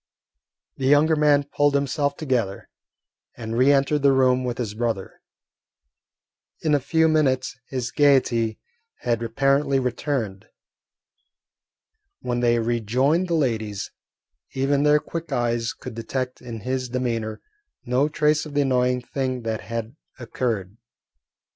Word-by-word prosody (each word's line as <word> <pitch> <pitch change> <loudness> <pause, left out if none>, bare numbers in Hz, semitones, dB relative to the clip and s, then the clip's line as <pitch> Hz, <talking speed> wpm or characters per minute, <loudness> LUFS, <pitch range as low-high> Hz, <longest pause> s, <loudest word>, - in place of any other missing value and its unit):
The 130 - -1
younger 150 +3 +5
man 150 -1 +4
pulled 145 0 +1
himself 140 +1 0
together, 125 -10 -2 0.7
and 115 -1 -5
re 130 +4 +5
entered 140 +1 +2
the 140 -1 +5
room 130 -1 +3
with 125 -2 -3
his 115 -4 -3
brother. 110 -3 -3 1.4
In 155 -2 +1
a 145 - +4
few 160 +4 +2
minutes 130 -5 +1
his 130 -2 -3
gaiety 125 -6 +3 0.4
had 120 -1 0
apparently 135 +4 +1
returned. 125 -5 -2 1.7
When 120 0 -2
they 120 -1 +3
rejoined 120 - +1
the 170 - 0
ladies, 110 -9 -1 0.6
even 135 +1 +1
their 150 0 +5
quick 165 +1 -7
eyes 120 -2 0
could - - -9
detect 125 +3 -4
in 115 -3 -7
his 130 +2 -2
demeanour 115 -3 -2 0.5
no 130 +4 +1
trace 150 0 +1
of 145 - -10
the 145 - +3
annoying 125 -2 +1
thing 130 -1 -3
that 110 -1 -2
had 115 +2 -5 0.2
occurred. 115 -5 -3
130 Hz, 130 wpm, -23 LUFS, 115-145 Hz, 1.7 s, younger